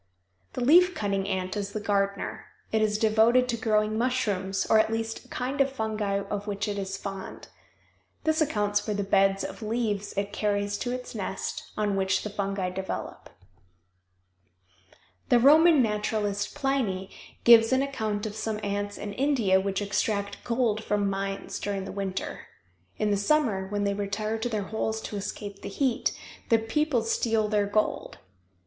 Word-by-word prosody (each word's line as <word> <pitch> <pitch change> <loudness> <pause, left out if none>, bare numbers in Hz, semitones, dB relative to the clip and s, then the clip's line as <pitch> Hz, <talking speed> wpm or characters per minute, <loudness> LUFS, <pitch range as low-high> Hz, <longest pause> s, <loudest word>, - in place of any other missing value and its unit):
The - - -4
leaf 360 +6 +6
cutting 195 -2 -1
ant 185 -1 -2
is 200 -1 -3
the 215 - -2
gardener. 200 -1 -1 0.3
It 220 - +2
is 210 -1 +2
devoted 225 +3 +4
to 235 - +1
growing 215 -1 +1
mushrooms 205 -6 0
or 220 - +5
at 220 - +2
least 225 0 -3
a - - -18
kind 265 +3 -2
of 275 0 +2
fungi 215 -5 -1
of 205 0 -4
which 200 0 -2
it 205 -1 -2
is 195 0 -4
fond. 195 -1 -7 0.7
This 315 0 +2
accounts 210 -8 +1
for 210 0 -3
the 200 - -1
beds 195 0 +3
of - - -6
leaves 215 -2 -2
it 200 0 -2
carries 205 -1 -1
to 245 - -2
its 250 0 -5
nest, 195 -3 -4
on 210 -2 +1
which 190 -1 +1
the 210 - -5
fungi 195 -2 -2
develop. 190 +1 -5 2.0
The 245 - +6
Roman 300 +3 +6
naturalist, 210 -1 -1
Pliny, 260 -10 -1 0.3
gives 230 -1 +7
an 260 +1 +3
account 220 -7 -2
of 210 -1 -5
some 220 -1 -3
ants 205 0 -2
in 205 -1 -5
India 235 -8 +2
which 195 +1 -1
extract 200 0 -1
gold 230 -3 0
from 205 -2 0
mines 195 0 -4
during 200 -2 -3
the - - -6
winter. 195 -1 -4 0.5
In 210 -1 +1
the 200 - +2
summer, 205 -4 +1
when 205 +1 -2
they 200 0 +1
retire 205 +2 -2
to 245 +2 -2
their 215 -3 -1
holes 220 +2 -2
to 210 - -6
escape 200 0 -6
the - - -6
heat, 250 +3 0 0.4
the 230 - +6
people 240 +3 0
steal 225 -1 +1
their 205 -1 +1
gold. 215 +1 -1
210 Hz, 165 wpm, -27 LUFS, 200-225 Hz, 2.0 s, gives